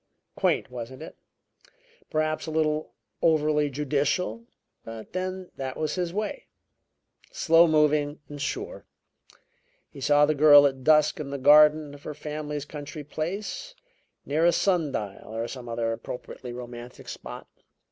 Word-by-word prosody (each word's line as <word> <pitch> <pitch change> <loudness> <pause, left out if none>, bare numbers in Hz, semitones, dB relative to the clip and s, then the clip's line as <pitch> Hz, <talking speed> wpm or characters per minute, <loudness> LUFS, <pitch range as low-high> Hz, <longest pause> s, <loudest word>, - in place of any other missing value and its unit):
Quaint, - - 0
wasn't 125 +4 -7
it? - - -10 0.9
Perhaps 155 +1 -1
a - - -3
little 155 -1 0 0.3
overly 150 -2 +3
judicial. 150 - -1 0.4
But 115 -1 -9
then 185 0 -4
that 130 -1 -4
was 155 -1 -1
his 180 -2 -2
way. 215 - -4 0.8
Slow 165 +1 +5
moving 150 -1 +2
and 145 -1 -8
sure. - - -4 1.0
He 140 - -11
saw 145 +2 +5
the 155 - +1
girl 145 -1 +8
at 135 -2 0
dusk 155 +1 +4
in 145 -2 -5
the 140 - -3
garden 150 +1 +6
of 145 - -12
her 150 - -7
family's 150 -1 -5
country 150 0 -8
place; 195 - -5 0.5
near 150 +3 0
a 175 - +6
sun 170 -4 +1
dial, 105 -1 -5
or 115 +1 -2
some 125 -2 -8
other 115 0 -1
appropriately 125 +1 -8
romantic 120 0 -9
spot. - - -8
150 Hz, 140 wpm, -26 LUFS, 135-155 Hz, 1.0 s, girl